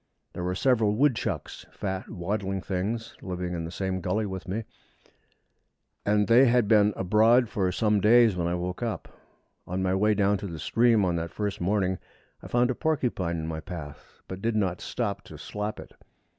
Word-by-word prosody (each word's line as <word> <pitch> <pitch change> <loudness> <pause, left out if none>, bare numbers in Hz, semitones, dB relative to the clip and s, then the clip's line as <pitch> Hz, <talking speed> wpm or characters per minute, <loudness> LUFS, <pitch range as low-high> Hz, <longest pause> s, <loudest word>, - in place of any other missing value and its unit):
There 90 - -5
were 90 +1 -1
several 110 -2 +2
woodchucks 115 - -1
fat, 95 -2 -4
waddling 95 0 -2
things 100 +6 -3
living 90 -1 -4
in 85 -1 -3
the 85 - -6
same 95 +1 -2
gully 105 +5 0
with 95 -2 -6
me, 105 +5 -2 1.4
and 105 0 +2
they 120 +4 +7
had 120 -2 +3
been 105 -1 +5
abroad 110 +6 +4
for 95 -3 0
some 105 +1 +1
days 115 -1 +6
when 85 -1 -1
I 85 - 0
woke 90 +3 -4
up. 115 -2 -4 0.5
On 95 +1 -2
my 95 0 +1
way 105 +2 +3
down 100 -1 +2
to 100 - -5
the 85 -3 -6
stream 115 +3 +3
on 85 -2 0
that 85 0 -3
first 105 +1 -3
morning, 95 0 +1 0.4
I - - -9
found 120 +1 +2
a - - 0
porcupine 125 - -1
in 80 - -4
my 80 0 -4
path, 75 -3 -9
but 95 0 -7
did 115 +1 0
not 95 -5 0
stop 110 -5 -3
to - - -11
slap 105 +1 -5
it. - - -11
100 Hz, 185 wpm, -27 LUFS, 90-110 Hz, 1.4 s, they